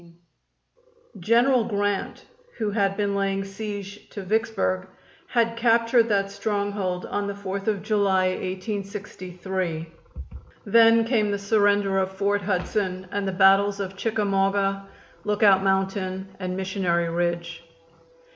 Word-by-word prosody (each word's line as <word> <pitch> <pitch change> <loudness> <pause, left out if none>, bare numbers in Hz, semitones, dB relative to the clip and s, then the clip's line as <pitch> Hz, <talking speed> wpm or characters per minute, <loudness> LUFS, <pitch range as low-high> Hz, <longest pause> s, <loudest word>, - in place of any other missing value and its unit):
General 235 +6 +3
Grant, 205 -3 -2 0.3
who 215 -3 -1
had 200 -2 0
been 200 -1 0
laying 195 0 0
siege 205 0 -7
to 200 - -7
Vicksburg, 190 -2 0 0.4
had 230 -1 +1
captured 230 0 +3
that 195 -1 +1
stronghold 200 -3 -2
on 205 0 -2
the 200 - -4
Fourth 200 0 -5
of 205 -3 0
July, 200 -3 +2
1863. 185 -3 -4 0.8
Then 225 +2 +5
came 225 -3 +1
the 200 - 0
surrender 205 -1 +2
of 190 0 -2
Fort 200 +1 +1
Hudson 185 -1 -2
and 200 -1 -2
the - - 0
battles 195 +2 +4
of 195 -1 -4
Chickamauga, 195 -2 0 0.4
Lookout 205 -2 +4
Mountain 190 0 -1
and 185 -1 -3
Missionary 185 -3 0
Ridge. 170 0 -2
200 Hz, 120 wpm, -24 LUFS, 190-210 Hz, 0.8 s, Then